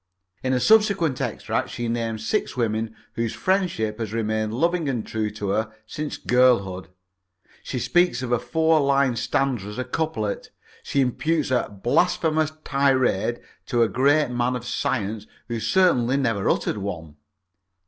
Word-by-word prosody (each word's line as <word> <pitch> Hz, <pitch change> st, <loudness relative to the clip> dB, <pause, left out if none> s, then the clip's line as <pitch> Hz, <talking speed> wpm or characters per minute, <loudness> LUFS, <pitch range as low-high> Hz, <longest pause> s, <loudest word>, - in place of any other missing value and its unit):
In 130 Hz, -, -1 dB
a 125 Hz, -, +2 dB
subsequent 200 Hz, -, +3 dB
extract -, -, -2 dB
she 120 Hz, -1 st, -4 dB
names 115 Hz, -2 st, -2 dB
six 110 Hz, -, -1 dB
women 110 Hz, -1 st, -1 dB, 0.2 s
whose 115 Hz, -1 st, -2 dB
friendship 175 Hz, -, 0 dB
has 110 Hz, -2 st, -4 dB
remained 110 Hz, -1 st, -1 dB
loving 165 Hz, +5 st, 0 dB
and 120 Hz, -5 st, -2 dB
true 110 Hz, -1 st, -2 dB
to 105 Hz, -1 st, -5 dB
her 110 Hz, +2 st, 0 dB
since 150 Hz, +6 st, -5 dB
girlhood. 105 Hz, -9 st, +2 dB, 0.7 s
She -, -, -5 dB
speaks 175 Hz, +2 st, +2 dB
of 125 Hz, -, -4 dB
a 120 Hz, -, +3 dB
four 160 Hz, +6 st, +2 dB
line 140 Hz, -3 st, +2 dB
stanza 125 Hz, -2 st, -1 dB
as 105 Hz, -, -7 dB
a 130 Hz, -, -1 dB
couplet. 125 Hz, -6 st, -3 dB, 0.3 s
She 140 Hz, -, 0 dB
imputes 150 Hz, +3 st, 0 dB
a 125 Hz, -, +1 dB
"blasphemous 155 Hz, -, +1 dB
tirade" 130 Hz, -5 st, +1 dB, 0.3 s
to 120 Hz, -1 st, +3 dB
a -, -, +3 dB
great 140 Hz, +3 st, +2 dB
man 120 Hz, +1 st, 0 dB
of 120 Hz, -1 st, -5 dB
science 110 Hz, -4 st, -2 dB, 0.2 s
who 120 Hz, -1 st, -3 dB
certainly 130 Hz, -, +3 dB
never 115 Hz, -7 st, 0 dB
uttered 105 Hz, -, 0 dB
one. 80 Hz, -6 st, -6 dB
120 Hz, 150 wpm, -24 LUFS, 110-140 Hz, 0.7 s, subsequent